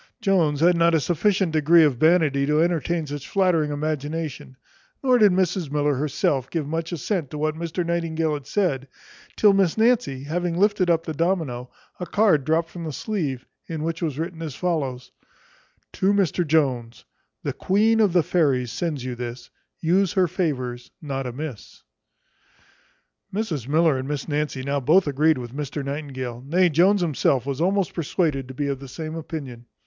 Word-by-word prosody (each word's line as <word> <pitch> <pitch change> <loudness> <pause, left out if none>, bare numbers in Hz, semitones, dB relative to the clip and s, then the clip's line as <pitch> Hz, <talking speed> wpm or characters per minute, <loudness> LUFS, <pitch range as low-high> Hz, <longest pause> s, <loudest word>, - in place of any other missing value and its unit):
Jones 165 -7 +2
had 175 +1 +5
not 170 0 +3
a - - +4
sufficient 180 +4 +1
degree 160 +2 +5
of 145 -5 +2
vanity 155 -3 +3
to 150 +1 +2
entertain 170 0 +1
any 160 - -3
such 145 -1 -7
flattering 180 -6 +2
imagination; 150 -2 -4 0.5
nor 255 -2 +4
did 210 -3 +6
Mrs 180 -3 0
Miller 145 0 +1
herself 140 -1 -1
give 160 -4 -2
much 165 +2 -3
assent 170 -1 -2
to 150 - -7
what 155 +1 0
Mr 170 +2 -3
Nightingale 165 -2 -1
had 145 -2 -6
said, 145 -10 0 0.5
till 210 -2 +5
Miss 195 -3 +2
Nancy 225 - +2
having 170 +3 -2
lifted 205 -2 +2
up 165 -1 +2
the 160 - -3
domino, 155 -7 -1 0.3
a 180 - -4
card 190 -10 +3
dropt 165 +2 +1
from 175 - -7
the 155 - -4
sleeve, 145 - -3 0.2
in 160 -2 -4
which 165 +1 -3
was 155 -5 -2
written 165 +1 -4
as 155 -5 -5
follows: 140 -8 -2 0.8
To 190 - +2
MR 185 -4 +1
JONES. 130 -7 0 0.4
The - - -2
queen 220 +4 +2
of 210 -4 +4
the 175 -1 +3
fairies 135 -8 +1
sends 150 -7 -3
you 130 - -3
this; 120 0 -7 0.3
Use 180 +2 +2
her 190 -3 +3
favours 130 -9 -3
not 135 -5 -4
amiss. 130 -1 -8 1.5
Mrs 180 - -3
Miller 155 -1 +3
and 130 - -5
Miss 145 -1 -3
Nancy 150 -3 -2
now 140 +1 -1
both 160 +9 +4
agreed 150 +2 +2
with 120 -1 -7
Mr 145 -1 -4
Nightingale; 130 -4 -5
nay, 175 +6 +3
Jones 185 +6 +4
himself 140 -6 +1
was 140 +1 -3
almost 190 +1 +1
persuaded 155 -5 -1
to 130 - -9
be 145 - -2
of 140 -1 -2
the 135 - -9
same 155 +3 -6
opinion. 140 -7 -7
155 Hz, 175 wpm, -23 LUFS, 140-175 Hz, 1.5 s, did